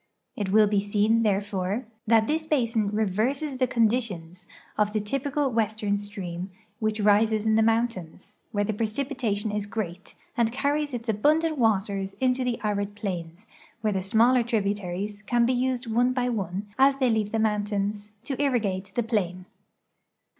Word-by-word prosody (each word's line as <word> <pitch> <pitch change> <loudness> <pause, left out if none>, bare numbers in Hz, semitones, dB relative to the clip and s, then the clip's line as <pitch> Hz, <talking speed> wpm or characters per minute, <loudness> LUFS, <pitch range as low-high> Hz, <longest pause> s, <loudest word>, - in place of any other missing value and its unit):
It 205 -3 -2
will 215 +1 +6
be 205 -1 +2
seen, 210 +3 +2
therefore, 200 +1 -1 0.2
that 225 -1 +5
this 315 +5 0
basin 230 -8 +1
reverses 220 +8 -1
the 255 0 +2
conditions 210 -8 -1 0.3
of 210 0 +1
the 215 - +1
typical 275 +6 -1
western 215 -2 0
stream 190 -3 -6 0.3
wdiich 215 -1 0
rises 215 +1 +3
in 220 - +3
the 220 - +4
moun 225 +2 +3
tains, 185 -7 -11
where 205 -1 0
the 215 +1 -1
precipitation 220 -1 -2
is 210 -1 -2
great, 200 -4 -5 0.2
and 235 -3 +2
carries 285 +2 -1
its 235 0 -6
abundant 300 +8 +2
waters 195 -3 +1
into 255 0 +1
the 245 -2 -1
arid 205 -1 -1
plains, 180 -2 -5 0.4
where 215 -2 +1
the 190 - -1
smaller 230 +6 +4
tributaries 205 -3 -2
can 240 -1 +3
be 255 - +2
used 255 0 0
one 245 +3 +1
l)y 250 -1 +1
one, 195 -3 -3
as 270 +1 +5
the,y 260 -2 +2
leave 215 -2 0
the 225 - 0
mountains, 210 -1 -1
to 270 +2 -3
irrigate 200 -9 0
the 240 - +1
plain. 185 -5 -2
215 Hz, 160 wpm, -26 LUFS, 205-245 Hz, 0.4 s, will